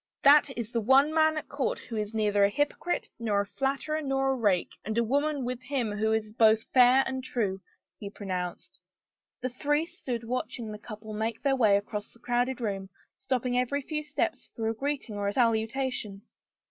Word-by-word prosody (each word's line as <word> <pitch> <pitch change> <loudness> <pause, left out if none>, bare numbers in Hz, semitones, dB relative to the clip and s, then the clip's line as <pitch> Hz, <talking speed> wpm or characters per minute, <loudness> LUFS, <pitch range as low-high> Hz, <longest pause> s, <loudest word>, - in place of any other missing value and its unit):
"That 290 +2 +7
is 235 -1 -4
the 235 - 0
one 270 +7 +5
man 315 0 +3
at 310 - -4
court 280 -2 -1
who 230 - -8
is 210 -1 -2
neither 210 -2 +2
a 200 - +5
hypocrite 290 +9 -1
nor 210 -3 +1
a - - -3
flatterer 275 +7 -2
nor 270 -1 +1
a - - +1
rake, 205 -7 +1
and 220 +2 -3
a 235 - +4
woman 285 +3 0
with 250 0 -3
him 255 -6 -2
who 215 +1 0
is 220 -1 0
both 220 0 +4
fair 255 +1 +7
and 260 -1 -3
true," 200 -7 -2 0.4
he 200 - -6
pronounced. 185 -4 -5 0.6
The 255 - -1
three 295 +5 0
stood 255 -9 -5
watching 235 -1 -3
the 210 - -7
couple 215 0 -9
make 220 +1 -3
their 275 -1 +3
way 215 -6 +5
across 205 +1 -5
the 235 - -19
crowded 245 +2 0
room, 195 -4 -3 0.3
stopping 250 -2 0
every 280 +3 -1
few 300 +2 -3
steps 300 0 -2
for 225 -1 -2
a - - 0
greeting 265 -3 -3
or 200 0 -1
a 200 - 0
salutation. 225 -3 0
240 Hz, 195 wpm, -28 LUFS, 215-270 Hz, 0.6 s, That